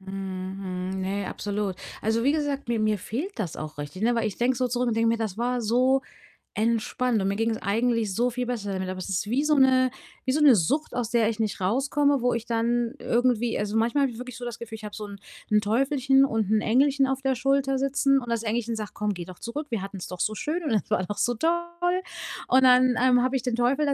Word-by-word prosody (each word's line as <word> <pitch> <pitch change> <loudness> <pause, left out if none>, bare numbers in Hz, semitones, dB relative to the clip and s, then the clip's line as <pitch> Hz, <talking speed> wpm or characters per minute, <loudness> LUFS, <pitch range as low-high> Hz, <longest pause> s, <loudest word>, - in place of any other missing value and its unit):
Mhm. 190 -1 -5 0.5
Mhm, 190 - -3
ne, 195 +1 -2
absolut. 205 -2 -3 0.2
Also, 225 +2 0
wie 280 - +4
gesagt, 285 -4 -2
mir 230 -2 0
mir 215 -1 +1
fehlt 290 - -5
das 180 -7 -3
auch 155 -1 -7
richtig, 145 +7 -6
ne? 240 +1 +3
Weil 230 -1 0
ich 205 - -4
denke 245 +1 +1
so 255 -1 0
zurück 245 0 0
und 225 - -1
denke 230 0 +3
mir: 230 - +2
„Das 220 -2 -3
war 245 +1 0
so 255 +4 +2 0.5
entspannt 230 +1 0
und 190 - 0
mir 200 - -1
ging's 225 0 0
eigentlich 225 -1 0
so 245 +4 +1
viel 250 +1 -3
besser 210 -5 -3
damit.“ 190 0 -3
Aber 185 0 -5
es 185 - -6
ist 195 +1 -1
wie 270 +5 +1
so 300 0 +3
'ne 260 -1 +5 0.4
wie 260 - +1
so 300 - +1
'ne 295 -4 +7
Sucht, 275 - 0
aus 240 -2 -1
der 235 -2 +2
ich 225 - -4
nicht 215 -3 -1
rauskomme, 275 +7 +1
wo 245 - +2
ich 230 0 -4
dann 235 0 0
irgendwie 240 -1 +1
also, 210 +1 -2
manchmal 235 +6 +2
habe 270 - +1
ich 230 - -10
wirklich 250 -1 -7
so 245 - -7
das 235 -1 -6
Gefühl, 230 -1 -7
ich 220 - -11
habe 210 -1 -7
so 215 - -6
'n 200 0 -9 0.3
'n 210 0 +4
Teufelchen 270 +5 +3
und 220 -5 -1
'n 215 - +3
Engelchen 270 +4 +3
auf 270 0 -2
der 270 - +2
Schulter 270 +1 +1
sitzen, 275 0 +2
und 240 - -8
das 230 -1 -1
Engelchen 230 +1 -1
sagt: 215 -1 -6
„Komm, 210 -1 -1
geh 175 - -6
doch 180 0 -12
zurück. 290 +6 -5
Wir 220 -4 -1
hatten's 195 -2 -6
doch 180 -1 -8
so 215 - 0
schön 330 +9 -2
und 295 - -2
das 210 - 0
war - - +2
doch 205 +2 -5
so 245 - +1
toll.“ 345 +5 0 0.5
Und 260 - +5
dann, 255 0 +6
ähm, 250 -1 +5
habe 260 +1 0
ich 255 - 0
den 250 -3 -1
Teufel 260 +5 +2
da 280 - +2
235 Hz, 255 wpm, -26 LUFS, 210-265 Hz, 0.5 s, ne